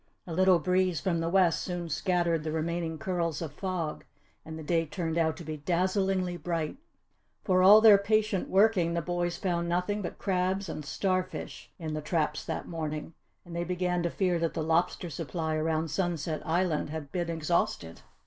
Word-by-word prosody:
A 170 - -6
little 185 +1 +5
breeze 180 0 +1
from 170 0 0
the 165 0 -1
west 180 -2 +3
soon 175 -2 -4
scattered 170 -1 0
the 155 - -3
remaining 160 +1 -2
curls 170 -1 -2
of 160 -4 -5
fog 180 -3 -3 0.4
and 160 0 -8
the 160 - -7
day 165 +2 +1
turned 165 0 -3
out 160 -2 +1
to 175 - -8
be 155 -1 -5
dazzlingly 185 +3 0
bright. 165 - -3 0.7
For 185 -1 +3
all 205 +4 +9
their 215 -3 +8
patient 210 -1 +1
working 190 -4 +3
the 170 - -1
boys 175 +1 -1
found 170 -2 -1
nothing 180 +4 0
but 175 - -5
crabs 190 0 0
and 155 - -5
star 185 +5 0
fish 185 - -8
in 160 -3 -5
the 155 - -3
traps 150 -1 -1
that - - -4
morning, 155 -1 -4 0.3
and 170 -1 -9
they 170 - -1
began 180 0 -1
to 170 - 0
fear 180 -1 0
that 165 -1 -1
the 160 - -1
lobster 165 +2 0
supply 160 +2 -3
around 155 0 0
Sunset 165 -4 -1
Island 165 -2 +1
had 150 -2 -6
been 175 -2 -2
exhausted. 160 - -1
170 Hz, 185 wpm, -29 LUFS, 160-185 Hz, 0.7 s, all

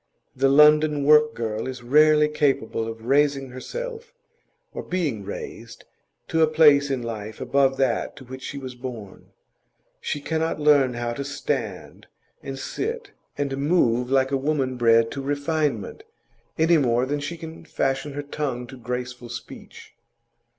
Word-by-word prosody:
The 135 +1 +3
London 150 +1 +5
work 150 +1 +5
girl 110 0 -3
is 130 -1 -7
rarely 150 +4 +5
capable 135 -7 0
of 115 0 -8
raising 140 0 +2
herself, 475 - -7 0.6
or - - -5
being 155 - -2
raised, - - -8 0.5
to 160 - +1
a 160 - +6
place 150 -2 +5
in 130 -3 -2
life 110 -2 -6
above 135 +1 +2
that 130 -3 0
to 135 - -12
which 130 +1 -9
she 140 - -6
was 130 -2 -7
born; 120 -6 -9 0.7
she 145 - -3
cannot 160 +2 -2
learn 145 -4 +4
how 120 0 -2
to 140 - -4
stand 140 +1 -4 0.3
and 135 -1 -6
sit 460 - -4 0.3
and 140 -1 -2
move 125 -5 +2
like 135 0 +2
a 135 - +2
woman 135 -2 -1
bred 115 -1 +4
to 140 - -5
refinement, 145 -4 -2 0.6
any 165 +1 +4
more 125 -2 +2
than 145 +2 -2
she 145 +4 -5
can 160 0 -9
fashion 135 -2 -2
her 145 +1 -4
tongue 140 -4 -4
to 130 +2 -11
graceful 125 0 -5
speech. 120 - -10
135 Hz, 150 wpm, -24 LUFS, 125-150 Hz, 0.7 s, a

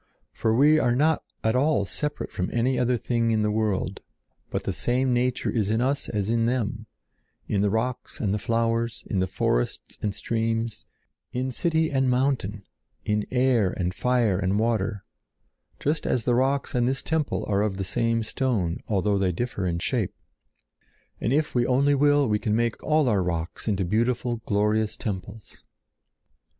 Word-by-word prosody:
For 110 - 0
we 150 +5 +5
are 120 -4 +2
not 155 +4 +3 0.2
at 110 +2 +2
all 135 -5 +2
separate 150 +8 -3
from 90 - -2
any 125 +2 +1
other 125 0 +2
thing 115 0 0
in 110 -1 +2
the 105 - +1
world, 105 -3 -1 0.5
but - - -2
the - - -2
same 125 +1 +1
nature 125 +1 0
is 105 -4 0
in 110 +1 +1
us 135 +3 0
as 105 -3 -1
in 115 0 +2
them—in 110 -3 -4
the 105 - +2
rocks 115 +4 -2
and 100 -3 0
the 105 - 0
flowers, 115 +1 0
in 95 - -1
the 95 - +1
forests - - -1
and 105 -2 -1
streams, 115 0 -2 0.5
in 130 +1 -1
city 160 +4 +1
and 135 -2 +2
mountain, 125 -6 0 0.4
in 105 0 0
air 125 -6 +3
and 90 0 -2
fire 120 -5 +1
and 95 +1 +1
water, 105 -3 0 0.8
just 150 +2 -1
as 120 - 0
the 125 - +3
rocks 135 +3 +1
and 120 -1 +2
this 135 +1 -1
temple 160 -2 -1
are 100 -1 +1
of 105 -2 -1
the 95 - -2
same 115 +3 0
stone, 110 -9 -1
although 100 -1 +1
they 95 -2 +2
differ 100 0 -2
in 85 -1 -1
shape. 105 +3 -1 1.0
And 115 - -1
if 150 +2 +1
we 120 -1 +2
only 140 +3 +3
will, 145 0 +4
we 105 -1 +1
can 105 0 0
make 115 0 0
all 155 -2 +2
our 105 -5 +2
rocks 85 +1 -3
into 100 -3 +1
beautiful, 120 +4 0
glorious 105 +1 +1
temples. 100 +1 -6
115 Hz, 170 wpm, -25 LUFS, 105-125 Hz, 1.0 s, we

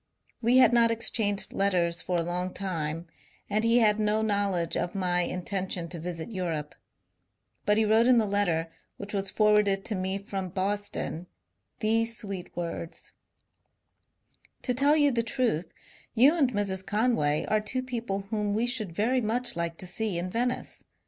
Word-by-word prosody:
'* - - -39
We 240 +2 +4
had 255 - +6
not 235 -1 +5
exchanged 220 -3 0
letters 180 -3 +1
for 180 -1 -1
a 170 - 0
long 180 +2 -3
time 165 -4 -3 0.5
and 215 +1 +1
he 230 +1 +4
had 215 -2 +4
no 215 +1 +1
knowledge 200 -5 0
of 175 - -2
my 180 -2 +1
intention 180 -1 -3
to 170 0 -6
visit 170 +3 -5
Europe; 165 -7 -3 0.9
but 210 0 +4
he 220 - +3
wrote 220 +2 +4
in 255 -1 +6
the 225 - +3
letter, 175 -5 0 0.3
which 200 +1 -7
was 195 -1 -1
forwarded 210 -2 +3
to 220 - -2
me 190 0 -1
from 195 -2 -5
Boston, 195 -2 -3 0.5
these 225 +1 +2
sweet 195 -4 -3
words: 170 -1 -5 0.8
— - - -37
To 250 - 0
tell 280 +4 +4
you 290 -2 +4
the 235 -2 +1
truth, 230 - -1 0.4
you 270 +8 +6
and 275 -7 +2
Mrs. 195 -3 -2
Conway 205 -10 +1
are 215 0 +2
two 255 +5 -2
people 235 -6 -3
whom 210 -2 0
we 225 +2 +1
should 230 -8 -1
very 250 +6 +1
much 240 +3 0
like 170 -1 -3
to - - -7
see 190 +1 -2
in 180 +1 -3
Venice. 245 +3 -2
205 Hz, 170 wpm, -28 LUFS, 180-230 Hz, 0.9 s, had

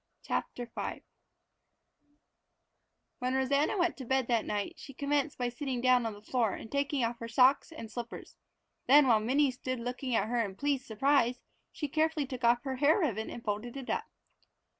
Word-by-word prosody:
CHAPTER 245 - -3
V 235 - -5 2.2
When 255 0 -1
Rosanna 280 +8 +2
went 350 -2 +1
to 265 - -7
bed 265 +1 +1
that 230 -2 +2
night 205 -1 -2
she 275 - -11
commenced 285 +1 0
by 245 -1 -1
sitting 255 0 -3
down 250 -1 +4
on 220 - -4
the 205 0 -13
floor 225 -3 0
and 220 - -8
taking 280 -1 0
off 235 +1 -1
her 230 - -5
own - - -7
socks 255 +6 +4
and 230 -9 -8
slippers. 240 0 -7 0.5
Then 285 +2 +8
while 225 -3 +5
Minnie 265 +5 +2
stood 255 0 -4
looking 245 +1 -3
at 220 - +1
her 235 0 +1
in 195 -3 -5
pleased 280 +1 -1
surprise, 250 +2 +2 0.3
she 295 - -4
carefully 310 0 +1
took 255 -2 -7
off 235 +1 +4
her 265 -2 -3
hair 290 +4 +4
ribbon 230 - -1
and 235 - -8
folded 215 +5 -3
it 270 -1 -4
up! - - -1
255 Hz, 185 wpm, -31 LUFS, 235-280 Hz, 2.2 s, Then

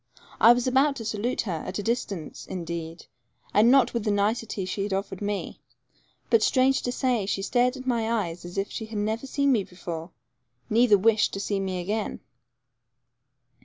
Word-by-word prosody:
I 230 - +8
was 245 0 -1
about 270 +3 +3
to 230 -4 -7
salute 220 +3 -1
her, 175 -7 -3
at 185 - -4
a 205 - -3
distance, 200 -8 -3
indeed, 170 -2 -6 0.5
and 215 +3 +5
not 270 0 +5
with 235 -3 -1
the 215 - 0
nicety 205 0 0
she 195 - -3
had 200 0 -2
offered 195 -1 -3
to - - -6
me, 205 -1 -4 0.7
but, 460 - +5
strange 270 -9 +3
to 245 - -2
say, 245 -6 0
she 195 0 -1
stared 250 +4 +1
at 260 - -9
my 230 -3 0
eyes 180 -7 -2
as 175 +2 -9
if 195 +1 -1
she 220 - -5
had 220 -1 -6
never 220 +5 -2
seen 280 +1 +1
me 225 -6 +2
before, 170 -2 -7 0.6
neither 225 -1 +5
wished 220 +2 +3
to 195 - -3
see 200 0 -1
me 190 -1 -2
again. 210 +4 -3
215 Hz, 190 wpm, -26 LUFS, 195-245 Hz, 0.7 s, I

